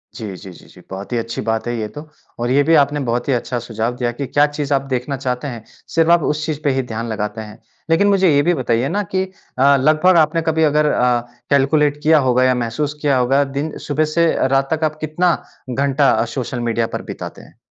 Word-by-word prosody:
जी, 105 -5 -6
जी, 95 +1 -10
जी, 85 - -15
जी, - - -17
बहुत 95 +3 -7
ही - - +1
अच्छी 115 0 -3
बात 110 +1 -2
है 120 - -2
ये 110 - -2
तो 150 +9 -10 0.3
और 120 +1 -1
ये 140 +2 +4
भी 165 +2 +4
आपने 145 0 +3
बहुत 120 +3 -1
ही - - +3
अच्छा 120 0 -2
सुझाव 115 +1 -3
दिया 120 -1 -1
कि 140 +4 -5
क्या 145 0 +3
चीज़ 145 -1 -3
आप 135 - +2
देखना 130 +3 -2
चाहते 125 +1 -3
हैं, 120 -5 -7 0.3
सिर्फ़ 165 0 +4
आप 170 -1 +5
उस 150 +1 -1
चीज़ 150 -2 -3
पे 145 - +2
ही 135 - 0
ध्यान 115 -1 -5
लगाते 105 0 -3
हैं। 105 0 -11 0.3
लेकिन 165 +5 +3
मुझे 195 -2 +4
ये 140 - +5
भी 175 - +2
बताइए 125 -2 0
ना 205 +1 -1
कि 185 - +2
अ, 140 -7 +1
लगभग 155 +6 +4
आपने 160 +1 +3
कभी 160 0 +2
अगर 150 0 +3
अ, 125 -1 +2 0.3
कैलकुलेट 145 +1 +2
किया 155 0 +5
होगा 125 +1 +3
या 130 0 +3
महसूस 125 +5 -2
किया 140 -3 +2
होगा 135 +3 +3
दिन 140 +3 -4
सुबह 150 +1 +1
से 170 -1 +4
अ, - - 0
रात 135 +2 +1
तक 160 0 -2
आप 155 0 0
कितना 165 +3 +1 0.3
घंटा 135 -1 +2
सोशल 125 -2 -3
मीडिया 115 0 0
पर - - -9
बिताते - - -8
हैं? - - -19
140 Hz, 235 wpm, -19 LUFS, 120-155 Hz, 0.3 s, आप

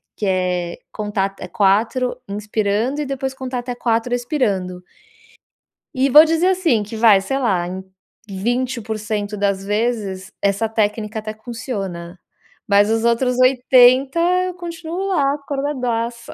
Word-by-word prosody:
que 210 - -4
é 180 -2 -1
contar 205 -2 -2
até 195 0 -10
4 230 +4 +1
inspirando 210 +5 -1
e 295 - -2
depois 265 -1 -3
contar 260 -1 -4
até 245 0 -5
4 230 0 -1
expirando. 200 -9 -1 1.1
E 265 +1 +1
vou 300 +4 +9
dizer 330 +2 +1
assim 345 - +2
que, 210 +2 -8
vai, 220 -3 +5
sei 270 +7 -2
lá, 185 -9 0
em 185 +1 -6 0.5
20% 240 +5 -2 0.6
das 200 -1 0
vezes 205 -2 -2
essa 200 +3 +1
técnica 215 0 -1
até 215 0 -6
funciona, 200 -7 -6 0.5
mas 205 +1 +4
os 225 0 +1
outros 245 +2 +1
80 255 +2 +5 0.3
eu 365 - -4
continuo 345 +1 -5
lá 285 -8 +1
acordadaça. 255 -5 -3
230 Hz, 130 wpm, -20 LUFS, 200-260 Hz, 1.1 s, vou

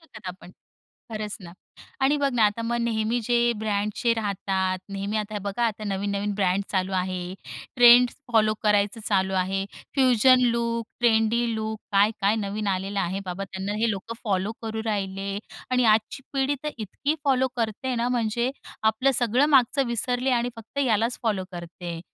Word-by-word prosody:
शकत 220 - -11
आपण. 180 0 -10 0.6
खरंच 215 -1 -4
ना. 170 -3 -10 0.5
आणि 270 +2 +3
बघ 285 -1 +1
ना 225 - +4
आता 210 +2 -2
मग 235 +1 -1
नेहमी 230 0 0
जे 240 +1 +2
ब्रँडचे 210 +2 0
राहतात. 190 -3 -1
नेहमी 200 +2 -3
आता 215 0 -3
हे - - -1
बघा 200 +4 -2
आता 215 -1 -4
नवीन 200 0 -2
नवीन 200 +1 -1
ब्रँड 195 -1 +1
चालू 190 0 -1
आहे. 185 0 -2 0.4
ट्रेंड 245 0 +8 0.2
फॉलो 215 -1 +4
करायचं 210 +1 +2
चालू 190 -2 +1
आहे. 190 +1 0 0.3
फ्युजन 255 -1 +5
लूक, 235 -1 -1
ट्रेंडी 230 0 +3
लूक 220 0 -3
काय-काय 205 +1 +3
नवीन 210 0 -3
आलेलं 195 +1 -1
आहे 190 +1 -2
बाबा 185 +2 -4
त्यांना 190 +1 -5
हे 230 0 +2
लोकं 200 +3 -5
फॉलो 200 +1 0
करू 220 0 -3
राहिले. 195 -2 -2 0.3
आणि 250 -1 +3
आजची 220 +4 +2
पिढी 275 +1 +1
तर 300 - 0
इतकी 235 +7 -2
फॉलो 260 -1 +3
करते 230 +3 -2
ना, 235 0 0
म्हणजे 235 0 0 0.3
आपलं 220 +5 +3
सगळं 245 +4 +3
मागचं 270 -1 +4
विसरले 245 +2 -1
आणि 240 +1 -1
फक्त 225 +5 -9
यालाच 230 +1 +1
फॉलो 210 -5 0
करते. 175 -1 -7
215 Hz, 165 wpm, -25 LUFS, 195-235 Hz, 0.6 s, ट्रेंड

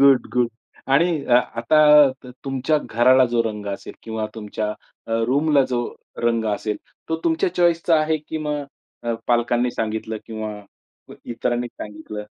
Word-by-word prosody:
Good, 135 -3 +6
good. 125 -1 +2 0.4
आणि 160 +1 +3
अ, 120 - +3
आता 150 +4 +5
त 125 - -9
तुमच्या 135 +3 +1
घराला 130 +1 +4
जो 115 -1 +3
रंग 105 -2 -4
असेल 100 - -7
किंवा 110 -1 -3
तुमच्या 105 -1 -4 0.4
अ, - - -3
रूम 145 +5 +1
ला 140 -2 +6
जो 125 -1 0 0.4
रंग 115 -1 +1
असेल 105 0 -3 0.3
तो 160 - 0
तुमच्या 335 +3 +1
चॉईस 170 -1 +3
चा 165 -2 +5
आहे, 155 +1 +1
की 155 +1 -6
मग 150 -1 -2 0.4
अ, 120 -1 -1
पालकांनी 120 0 +2
सांगितलं 110 -1 -3
किंवा 110 -1 -5 0.7
इतरांनी 120 +1 -2
सांगितलं? 105 -1 -8
125 Hz, 155 wpm, -22 LUFS, 115-150 Hz, 0.7 s, Good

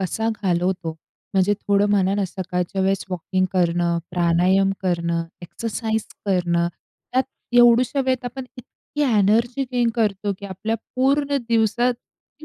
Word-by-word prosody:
कसा 220 +5 -1
घालवतो, 180 -1 0 0.4
म्हणजे 195 +2 +3
थोडं 200 0 +2
म्हणा 195 -1 +2
ना, 205 - 0
सकाळच्या 185 0 -3
वेळेस 195 0 +1
वॉकिंग 185 +1 -1
करणं, 175 -1 +1
प्राणायाम 180 +3 +3
करणं, 170 -2 0 0.2
एक्सरसाइज 220 +3 -3 0.2
करणं 170 -3 +1 0.4
त्यात 260 - +3 0.4
एवढुशा 240 +3 +5
वेळेत 260 -1 0
आपण 250 +2 -5
इतकी 275 +4 -7 0.2
एनर्जी 230 +6 +2
गेन 240 -2 +2
करतो 205 -3 0
की, 200 - -7
आपल्या 215 +4 -3 0.2
पूर्ण 280 +2 +2
दिवसात 235 +2 +2
ती 300 +5 -21
200 Hz, 130 wpm, -22 LUFS, 180-235 Hz, 0.4 s, एवढुशा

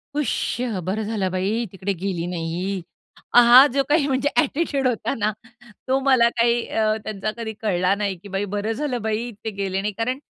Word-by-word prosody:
"हुश! 290 -4 -1 0.2
बरं 205 +5 -2
झालं, 205 -4 -2
बाई 205 +6 -1
तिकडे 195 +1 -3
गेली 180 -1 -3
नाही." 175 +2 -3 0.5
हां, 245 +3 +9
जो 275 -1 +2
काही 295 -1 +3
म्हणजे 270 +1 +1
अ‍ॅटिट्यूड 285 -3 +1
होता 245 +2 -1
ना, 215 0 0 0.6
तो 265 +1 +2
मला 255 -4 +5
काही 235 0 +2
अ, 215 -1 +1
त्यांचा 215 0 -3
कधी 220 -1 -4
कळला 185 -2 +1
नाही, 200 -2 -2
की - - -9
"बाई, 195 +1 -2
बरं 205 +2 -2
झालं 255 -2 -2
बाई, 220 +2 -2
ते - - 0
गेले 195 -1 -2
नाही." 210 0 -2
कारण 250 +4 -1
220 Hz, 180 wpm, -22 LUFS, 195-245 Hz, 0.6 s, हां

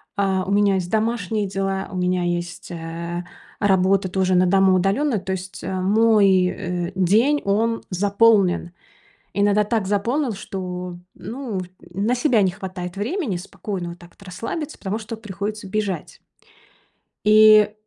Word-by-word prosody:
А, 190 -2 0
у 200 - -3
меня 200 -1 +3
есть 180 -2 -2
домашние 220 -2 0
дела, 195 0 -2
у 185 - -5
меня 180 0 0
есть, 175 0 -3
э, 170 +1 -5 0.4
работа 195 -1 +3
тоже 185 0 +1
на 180 - +4
дому 190 +1 +4
удалённо. 205 +6 +1
То 190 0 -4
есть, 190 0 -7
э, 190 - -3
мой, 200 -2 +4
э, 180 -1 -3
день 220 +11 +3
он 225 +3 0
заполнен. 200 -2 +3 0.6
Иногда 205 +1 +3
так 215 -2 -1
заполнил, 235 +7 0
что, 180 -2 -6
м, 175 - -22
ну, 235 -5 -5
в 185 - -6 0.3
на 210 +6 +1
себя 245 -4 +3
не 190 - +3
хватает 185 -1 -7
времени 230 - -2
спокойно 180 0 -6
вот 170 - -10
так 175 0 -15
вот - - -22
расслабиться, 230 - -5
потому 200 +2 -3
что 225 +1 -7
приходится 210 0 -5
бежать. 200 -1 -3 1.1
И, 215 0 +7
195 Hz, 150 wpm, -22 LUFS, 180-215 Hz, 1.1 s, И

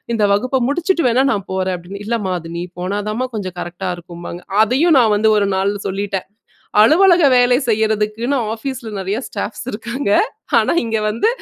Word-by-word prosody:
இந்த 215 -2 +2
வகுப்ப 255 +5 0
முடிச்சுட்டு 345 +1 0
வேணா 255 +3 +3
நான் 200 -3 -4
போறேன்னு. 185 +1 -3
இல்லமா 210 -5 -1 0.2
நீ 170 - -3 0.2
போனாத்தாம்மா 205 +6 -2
கொஞ்சம் 185 -4 -5
கரெக்ட்டா 180 +2 -4
இருக்கும்பாங்க. 175 0 -9 0.2
அதையும் 275 +8 +3
நான் 220 -3 +4
வந்து 220 +1 +3
ஒரு 200 - +1
நாள் 195 +1 +1 0.2
சொல்லிட்டேன். 195 0 -3 0.5
அலுவலக 345 - +5
வேலை 245 0 +4
செய்யறதுக்குன்னு 220 +4 0
ஆபிஸ்ல 240 0 -5
நெறையா 195 +4 -2
ஸ்டாப்ஸ் 210 +3 -5
இருக்காங்க. 235 +2 -4 0.5
ஆனா - - +2
இங்க 225 -1 -1
வந்து 225 - +1
215 Hz, 145 wpm, -18 LUFS, 195-250 Hz, 0.5 s, அலுவலக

